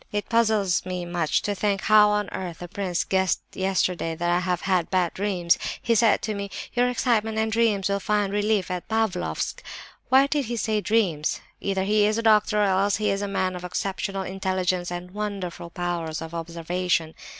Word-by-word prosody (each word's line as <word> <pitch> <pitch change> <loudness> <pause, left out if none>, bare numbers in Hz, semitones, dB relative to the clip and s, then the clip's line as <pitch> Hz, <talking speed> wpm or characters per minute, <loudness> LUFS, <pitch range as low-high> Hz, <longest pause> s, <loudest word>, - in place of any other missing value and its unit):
"It 205 0 -3
puzzles 215 -5 +2
me 180 -1 -4
much 175 -3 0
to 205 - -1
think 200 0 0
how 210 0 +6
on 210 -1 0
earth 175 -3 -5
the 175 - -8
prince 180 -1 -2
guessed 190 -2 +1
yesterday 185 -3 0
that 175 +1 -1
I 175 - +3
have 180 -1 -1
had 185 -4 +1
bad 185 -3 +1
dreams. 185 -4 +1 0.2
He 235 - +1
said 225 -1 +3
to 215 - -1
me, 200 -1 -4 0.2
'Your 245 +1 +2
excitement 225 -3 0
and 220 0 0
dreams 220 -4 +2
will 200 0 0
find 205 -1 0
relief 205 -2 +1
at 180 -1 -4
Pavlofsk.' 220 - -1 0.5
Why 265 +1 +6
did 285 -1 0
he 235 +1 -3
say 215 -1 0
'dreams'? 190 -9 +1 0.2
Either 195 -1 -1
he 210 +1 +3
is 215 +1 0
a 230 - -1
doctor, 215 -1 +4
or - - +4
else 195 +1 +2
he 210 -1 0
is 195 0 -1
a 205 - -2
man 185 -2 -1
of 180 - -7
exceptional 195 +1 -3
intelligence 185 -1 -1
and 175 +1 -6
wonderful 195 -4 -5
powers 170 -2 -3
of 160 0 -7
observation. 170 0 -2
195 Hz, 195 wpm, -25 LUFS, 180-210 Hz, 0.5 s, how